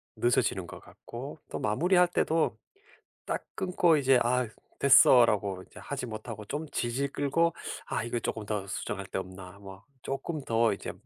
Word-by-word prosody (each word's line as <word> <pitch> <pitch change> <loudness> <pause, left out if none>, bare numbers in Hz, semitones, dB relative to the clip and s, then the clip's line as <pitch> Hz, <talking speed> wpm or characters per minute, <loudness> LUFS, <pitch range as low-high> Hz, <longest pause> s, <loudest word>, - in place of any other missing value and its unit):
늦어지는 105 -6 +1
것 - - -9
같고 135 +6 -9
또 - - -4
마무리할 180 - +3
때도 165 -2 +1 0.7
딱 - - -3
끊고 180 -4 +3
이제 135 -2 +4
'아 125 0 +1 0.3
됐어.'라고 105 -8 +5
이제 - - -13
하지 135 -2 -5
못하고 110 -1 -7
좀 150 +7 -4
질질 130 +4 -2
끌고 165 +4 +1 0.3
'아 - - -2
이거 120 0 -2
쪼끔 110 -2 -4
더 105 -2 -2
수정할 100 0 -4
데 - - -3
없나.' 95 +1 -9
뭐 95 0 -11 0.2
'쪼끔 140 +3 -4
더 115 -3 +2
이제 - - -6
120 Hz, 295 characters per minute, -29 LUFS, 105-145 Hz, 0.7 s, 됐어.'라고